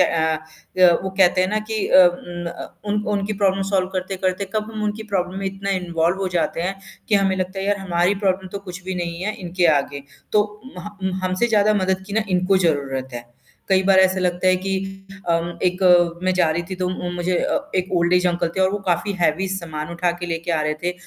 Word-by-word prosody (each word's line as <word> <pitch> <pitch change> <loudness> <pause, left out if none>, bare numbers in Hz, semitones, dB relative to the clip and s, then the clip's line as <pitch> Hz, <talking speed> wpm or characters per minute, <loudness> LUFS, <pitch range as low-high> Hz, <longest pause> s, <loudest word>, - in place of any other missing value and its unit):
अ 160 +1 -1
अ, - - +6
वो 190 - -3
कहते 190 -1 +3
हैं 185 - +2
ना 215 - 0
कि 220 -2 0
अ, 185 - +8
उम, 175 0 -4
अ, 170 - -9
उन 210 0 0
उनकी 200 +1 -1
प्रॉब्लम 195 -1 +1
सॉल्व 185 -2 +1
करते-करते 185 0 -2
कब 215 0 -1
हम 215 - -4
उनकी 210 +1 -2
प्रॉब्लम 185 0 -1
में 195 - -3
इतना 195 +1 -3
इन्वॉल्व 170 0 0
हो 190 - 0
जाते 165 - 0
हैं, 190 +2 -2 0.3
कि 215 - +3
हमें 195 -1 +3
लगता 185 +1 -3
है 190 - -2
यार 205 0 +2
हमारी 175 +2 +2
प्रॉब्लम 190 0 +1
तो 200 - -3
कुछ 180 0 -7
भी 190 0 -3
नहीं 170 0 -4
है 215 +1 -1
इनके 175 0 +1
आगे। 140 0 -5 0.3
तो 210 0 +1 0.2
महा 205 +3 -8
उम, 190 0 0
हमसे 185 +5 +1
ज़्यादा 215 -1 +3
मदद 190 0 0
की 200 - -8
ना 220 +1 +2
इनको 185 +1 +2
ज़रूरत 135 -4 -1
है। 120 0 -6 0.4
कई 190 -1 +4
बार 190 -1 +6
ऐसे 190 0 +4
लगता 180 0 0
है 185 0 +5
कि 195 - -2 0.6
अम, 170 +1 0
एक 180 +1 0 0.4
मैं 185 - +2
जा 180 -3 +3
रही 165 +2 -1
थी - - -2
तो 185 0 -1
उ, 180 -1 -4
मुझे 175 0 0
अ, 295 +1 -1
एक 185 0 -1
ओल्ड 170 0 +2
ऐज 180 0 +3
अंकल 175 -1 0
थे - - +1
और 190 0 +4
वो 205 - -2
काफ़ी 190 +4 0
हैवी 175 +3 +1
सामान 165 -5 -4
उठा 175 +1 0
के 175 - -3
लेके 165 0 -3
आ 160 - +1
रहे 150 0 0
थे, 175 +1 0
185 Hz, 235 wpm, -21 LUFS, 175-195 Hz, 0.6 s, अ